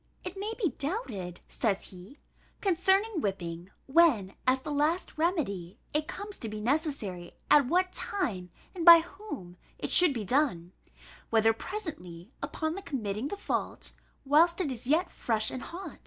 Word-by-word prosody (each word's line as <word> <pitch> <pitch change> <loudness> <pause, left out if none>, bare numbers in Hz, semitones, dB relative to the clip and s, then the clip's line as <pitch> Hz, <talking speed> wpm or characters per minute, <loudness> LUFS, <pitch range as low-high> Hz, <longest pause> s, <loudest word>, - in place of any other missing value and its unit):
"It 365 +1 -6
may 405 +3 -3
be 395 -8 +1
doubted," 225 - -3
says 200 -4 -1
he, 185 +10 -13 0.4
"concerning 385 +1 +2
whipping, 175 -4 -4 0.2
when, 265 - +4
as 260 +1 +3
the 295 - -5
last 300 +5 0
remedy, 235 - -1 0.2
it 300 0 0
comes 405 +1 -6
to 225 - -5
be 215 0 -5
necessary, 225 - -2 0.2
at 285 -4 +6
what 365 +5 +1
time, 200 - -2 0.2
and 355 -3 -4
by 335 0 +11
whom, 325 - -9 0.2
it - - -3
should 350 -6 +7
be 220 -3 -3
done; 210 - +1 0.6
whether 225 0 +4
presently, 220 - -7
upon 315 +2 -2
the 390 - -6
committing 225 - -3
the 405 - -5
fault, 400 - -3 0.3
whilst 330 +5 +4
it 325 -7 -1
is 245 -1 -4
yet 325 +6 +2
fresh 220 -2 -1
and 255 - -5
hot. 365 +3 -8
285 Hz, 155 wpm, -29 LUFS, -, 0.6 s, by